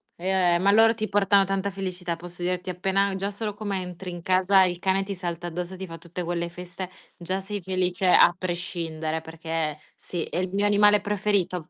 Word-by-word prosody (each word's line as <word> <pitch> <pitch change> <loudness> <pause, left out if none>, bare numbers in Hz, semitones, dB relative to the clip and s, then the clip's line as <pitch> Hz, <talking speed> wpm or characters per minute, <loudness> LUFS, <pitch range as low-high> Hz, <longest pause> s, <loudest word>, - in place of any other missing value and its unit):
Eh, 180 -1 +2
ma 195 +3 +3
loro 225 +2 +6
ti 215 -1 -2
portano 200 -1 +4
tanta 195 +1 -1
felicità, 185 -2 -4
posso 175 +1 -11
dirti, 180 +1 -1
appena 195 +2 +1
già 195 +1 -1
solo 210 +1 -4
come 200 -2 -3
entri 180 +1 -7
in 175 -1 -7
casa 190 +1 +4
il 175 -1 -1
cane 190 +1 +1
ti 200 - -4
salta 175 -2 -5
addosso, 175 +2 -4
ti 190 +1 -6
fa 165 -1 -9
tutte 170 +2 -6
quelle 170 0 -2
feste, 180 +1 -7 0.3
già 185 +2 -3
sei 200 +1 -5
felice 185 0 -1
a 175 - +7
prescindere 170 -3 -3
perché 160 -1 -3 0.2
sì, 175 -3 -5
è - - -4
il 185 0 -1
mio 200 +2 +1
animale 205 0 +5
preferito, 200 -4 0
185 Hz, 195 wpm, -25 LUFS, 175-195 Hz, 0.3 s, a